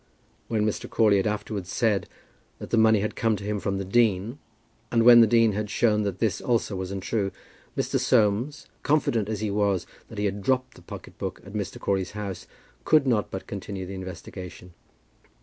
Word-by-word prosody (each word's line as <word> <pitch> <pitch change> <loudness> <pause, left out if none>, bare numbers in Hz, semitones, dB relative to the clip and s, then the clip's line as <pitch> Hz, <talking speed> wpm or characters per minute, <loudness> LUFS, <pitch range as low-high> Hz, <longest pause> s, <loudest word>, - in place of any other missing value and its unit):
When 110 -2 0
Mr. 105 - -2
Crawley 105 -3 +4
had 95 - +1
afterwards 105 -3 -3
said 110 -5 +1 0.5
that - - -9
the - - +3
money 110 -2 +5
had 105 - -2
come 115 -1 +1
to 100 - -8
him 105 0 -2
from 100 0 -2
the 95 - -3
dean, 110 +3 +1 0.5
and 115 -1 +3
when 120 0 +9
the 115 - +6
dean 115 0 +4
had 105 +1 -3
shown 105 0 +2
that 100 -3 -2
this 105 -3 0
also 115 -4 0
was 95 -1 -4
untrue, 100 +1 -2 0.5
Mr. - - 0
Soames, 120 +6 +1 0.2
confident 120 -8 +1
as 110 -2 -3
he 105 -2 -1
was 100 -3 +1 0.2
that 110 - -11
he 105 - 0
had 100 0 -2
dropped 130 +4 0
the - - -16
pocket - - -11
book - - -4
at 100 - -11
Mr. 105 -3 -4
Crawley's 95 -2 -1
house, 100 -3 -5 0.4
could 155 -3 +4
not 115 -5 +1
but 95 - -6
continue 100 -1 -6
the 95 - -7
investigation. 90 -1 -8
105 Hz, 195 wpm, -26 LUFS, 95-115 Hz, 0.5 s, when